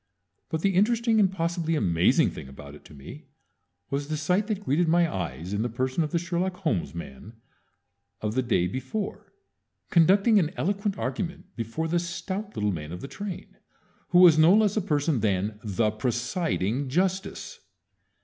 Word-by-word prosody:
But 160 - -2
the 195 +2 +2
interesting 225 +3 +3
and 195 -3 +4
possibly 165 -2 -1
amazing 85 - +3
thing 65 - -9
about 70 +1 -11
it 75 - -14
to 75 - -14
me 70 - -11 0.6
was 140 +1 -2
the 155 0 -2
sight 180 +7 +1
that 210 -3 -3
greeted 165 +1 +1
my 170 +1 +4
eyes 90 - -5
in 105 - 0
the 120 - -1
person 130 +6 -1
of 155 - -3
the 170 - 0
Sherlock 175 +2 -2
Holmes 130 - -2
man 85 - -9 0.9
of 105 0 -2
the 130 - +1
day 120 -8 +1
before, 130 - -5 0.6
conducting 195 +6 +5
an 160 -4 -1
eloquent 200 +2 -1
argument 165 +7 -4
before 115 +8 -3
the 170 +2 +1
stout 190 +4 -5
little 105 0 0
man 75 -3 -6
of 90 - -7
the - - -6
train, 200 +3 -7 0.5
who 175 - +3
was 175 -3 +8
no 165 +5 +7
less 210 -2 +3
a 215 - +1
person 150 - 0
than 105 0 -1
the 105 +1 0
Presiding 125 - -1
Justice! 185 +6 -2
155 Hz, 170 wpm, -26 LUFS, -, 0.9 s, was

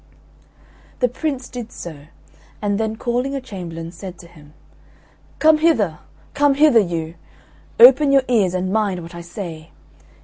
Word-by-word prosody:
'" - - -29
The 250 - +3
Prince 260 0 -4
did 240 -2 -8
so, 150 -4 -10 0.5
and 205 0 -1
then 220 0 -1
calling 250 +4 -2
a - - -2
chamberlain, 170 -9 -8
said 180 +1 -9
to 170 - -14
him, 155 -3 -18 0.8
"Come 310 0 +4
hither, 215 - +2 0.3
come 290 -1 +3
hither, 290 -5 +5
you! 165 -5 -2 0.7
Open 270 +4 +8
your 275 -1 +4
ears 205 -7 +2
and 185 +1 -2
mind 200 -5 0
what 170 +1 -11
I 170 - -8
say. 170 -3 -8
205 Hz, 150 wpm, -20 LUFS, 170-255 Hz, 0.8 s, Open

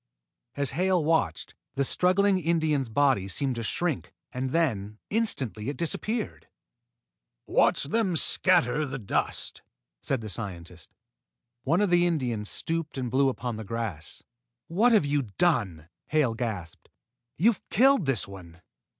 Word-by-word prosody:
As 140 -1 -1
Hale 180 +2 +1
watched, 160 - 0 0.2
the 140 - +1
struggling 185 +6 +2
Indian's 155 -6 0
body 130 -5 +2
seemed 130 +7 -1
to - - -2
shrink, 115 - -2 0.2
and 130 +1 -2
then, 110 -10 -1
instantly, 135 - 0
it 145 - -5
disappeared. 215 +7 -2 1.0
"Watch - - +2
them 185 +4 0
scatter 160 -4 +4
the 135 0 -4
dust!" 105 -7 -3 0.4
said 135 -4 -1
the 110 - -6
scientist. 90 -6 -6 0.8
One 165 +8 +2
of 205 -3 +1
the 175 0 +4
Indians 120 -10 -2
stooped 165 -3 -3
and 125 -3 -3
blew 135 +1 +3
upon 125 -3 -4
the 110 - -6
grass. 105 -8 -5 0.4
"What 215 +9 +3
have 215 -9 +4
you 145 0 +1 0.2
done!" 100 - +1 0.2
Hale 150 -7 +2
gasped. 105 -8 -5 0.5
"You've 215 +5 +3
killed 265 - +4
this 130 -7 +1
one. 90 -3 -12
140 Hz, 135 wpm, -27 LUFS, 110-170 Hz, 1.0 s, scatter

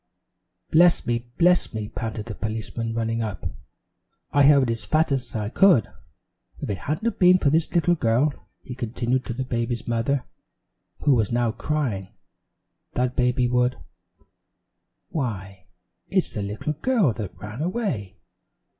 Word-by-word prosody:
"Bless 170 +2 +5
me! 120 0 -2
Bless 175 -8 +3
me!" 110 -1 -3
panted 110 -1 -5
the 115 - -6
policeman, 115 +1 -4
running 115 0 -1
up. 105 -5 -4 0.9
"I 145 -1 +5
hurried 140 -5 +5
as 115 - -4
fast 155 -1 +2
as 130 -2 -2
I 105 -2 -2
could. 175 - +4 0.7
If - - -3
it 100 - -3
hadn't 210 +9 -1
been 180 0 +7
for 145 -6 +2
this 160 +1 +1
little 175 +1 +4
girl," 135 0 +2 0.3
he 125 - -7
continued 125 +1 -2
to 120 - -2
the 130 - -2
baby's 120 -1 -2
mother, 120 +3 0 0.8
who 145 - +6
was 110 -4 +1
now 120 -1 +1
crying, 115 -6 -2 0.8
"that 125 0 0
baby 125 0 +2
would 125 +1 +1 1.3
Why, 100 - -4 0.4
it's - - +1
the 105 - -4
little 105 +9 -3
girl 195 - +2
that 105 -4 -6
ran 105 +5 -7
away! 165 - -2
120 Hz, 145 wpm, -24 LUFS, 110-150 Hz, 1.3 s, been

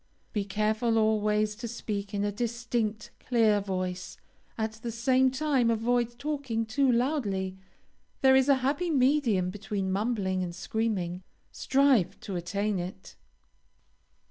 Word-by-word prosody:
Be 205 -2 -1
careful 215 +3 +1
always 215 -1 +2
to 235 0 -5
speak 205 -3 -4
in 205 -1 -1
a 205 - 0
distinct, 230 -1 -2
clear 225 -4 +3
voice; 185 -2 -4 0.4
at 220 -1 -1
the 225 +2 -7
same 255 +3 +3
time 265 -3 +1
avoid 240 +1 0
talking 275 -6 -2
too 265 +4 +2
loudly, 210 -8 -1 0.6
there 265 -1 +6
is 265 +1 +4
a 280 - +7
happy 305 +6 0
medium 255 - +2
between 195 -1 -3
mumbling 195 -2 0
and 175 -1 -4
screaming. 185 -4 -2 0.3
Strive 265 - +2
to 195 - -5
attain 200 +3 -1
it. 185 +2 -7
220 Hz, 130 wpm, -28 LUFS, 200-245 Hz, 0.6 s, a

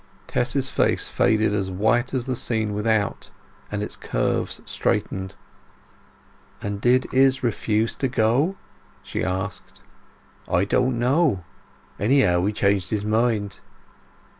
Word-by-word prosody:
Tess's 130 +2 0
face - - +1
faded 110 -1 +2
as 100 -2 -1
white 110 +6 +1
as 130 -3 -2
the 130 -1 -2
scene 110 -3 -1
without, 105 -1 0 0.4
and 105 0 -2
its - - -5
curves - - -2
straightened. 95 0 -2 1.2
"And 100 0 -4
did 125 +3 +3
Izz 130 0 +4
refuse 110 -1 0
to 135 - 0
go?" 125 - +1 0.5
she - - -3
asked. 95 +1 -4 0.7
"I 90 +3 +2
don't 125 +4 +1
know. 125 - +2 0.6
Anyhow 100 -6 +3
he - - +1
changed 100 -3 +1
his 105 -1 -2
mind." 110 -2 0
110 Hz, 120 wpm, -23 LUFS, 100-125 Hz, 1.2 s, Izz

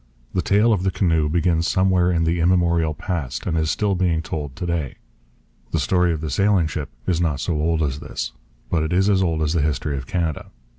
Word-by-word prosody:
The 90 - +1
tale 105 +5 +3
of 100 - 0
the 95 - +1
canoe 80 -5 +1
begins 85 0 +1
somewhere 95 -1 +2
in 85 -2 +1
the 85 +1 +1
immemorial 85 -2 +2
past 75 -9 -4
and 80 - -1
is 80 -1 +1
still 100 +4 +1
being 90 -3 0
told 75 -4 -5
to - - -4
day. 85 -6 -2 0.7
The - - -1
story 90 -2 +2
of 80 -2 -3
the 80 -2 -4
sailing 100 +2 +3
ship 75 -2 -4 0.2
is 85 -2 0
not 75 -5 0
so 85 - -1
old 80 +1 +1
as 70 -1 -2
this. 75 -1 -5 0.4
But 85 - +2
it 80 +2 -1
is 95 +3 +3
as 95 -1 +3
old 80 -4 0
as 75 +1 0
the 85 - +1
history 75 -1 -1
of 65 -2 -7
Canada. 85 -5 -2
85 Hz, 220 wpm, -22 LUFS, 75-90 Hz, 0.7 s, tale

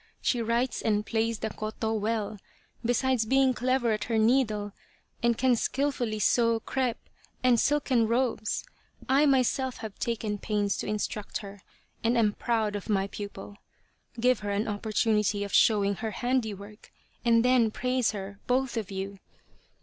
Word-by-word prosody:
She 245 - 0
writes 235 +2 0
and 210 -1 +1
plays 225 0 0
the 220 0 -4
koto 220 +1 -3
well, 215 -1 -2 0.4
besides 245 0 +2
being 265 +1 +4
clever 250 -1 +1
at 215 -1 -1
her 225 -1 0
needle, 220 -3 +2 0.5
and 235 -1 +2
can 255 -1 +3
skilfully 250 -3 -1
sew 230 +2 +3
crepe 250 0 -1 0.5
and 245 -2 +4
silken 265 -5 +2
robes. 235 -2 0 0.4
I 275 +3 +4
myself 260 -1 +1
have 220 -3 -8
taken 220 -3 -2
pains 205 -1 0
to - - -4
instruct 210 0 -3
her, 200 0 -11 0.4
and 235 +2 +2
am 215 -3 +3
proud 220 -3 -1
of 205 +2 -6
my 195 -2 +2
pupil. 205 0 -8 0.6
Give 250 0 +3
her 205 - -5
an 205 +2 -1
opportunity 210 -1 0
of 200 - -6
showing 200 -3 +4
her 220 0 -3
handiwork, 215 -4 -3 0.3
and 230 -1 +4
then 250 -3 +4
praise 250 +1 0
her 200 -1 -6
both 255 -1 +1
of 215 -4 -3
you. 195 0 -5
225 Hz, 150 wpm, -28 LUFS, 210-250 Hz, 0.6 s, being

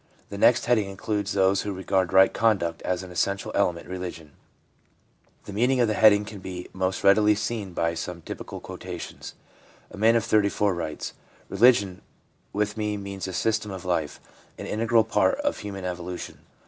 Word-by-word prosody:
The 100 - -6
next 120 - +4
heading 110 -5 +2
includes 100 +1 -3
those 95 0 +3
who 105 - -4
regard 95 -1 0
right 95 0 +6
conduct 95 -8 +1
as 90 0 -2
an 90 - -10
essential 100 +3 -1
element 90 -4 0
in - - -11
religion. 90 -4 -6 1.1
The 100 - -8
meaning 125 +5 +2
of 120 - +4
the 110 - 0
heading 105 -1 +5
can 105 -1 -9
be 90 -1 -7
most 95 0 -2
readily 105 +2 +5
seen 105 -3 -4
by 85 0 0
some 85 0 -6
typical - - -7
quotations. - - -8 0.6
A - - -10
man 110 +3 +4
of 115 - +1
34 105 -1 +2
writes: 85 -3 -5 0.2
' - - -30
Religion 100 -3 +3 0.5
with 105 +1 -1
me 105 -1 -1
means 100 -1 -6
a 95 - -5
system 110 +2 0
of 95 -2 -7
life, 80 -5 -1 0.4
an - - -7
integral 115 +1 +2
part 115 - +2
of 290 0 -1
human 95 -2 -6
evolution. 90 0 -6
100 Hz, 175 wpm, -25 LUFS, 90-105 Hz, 1.1 s, right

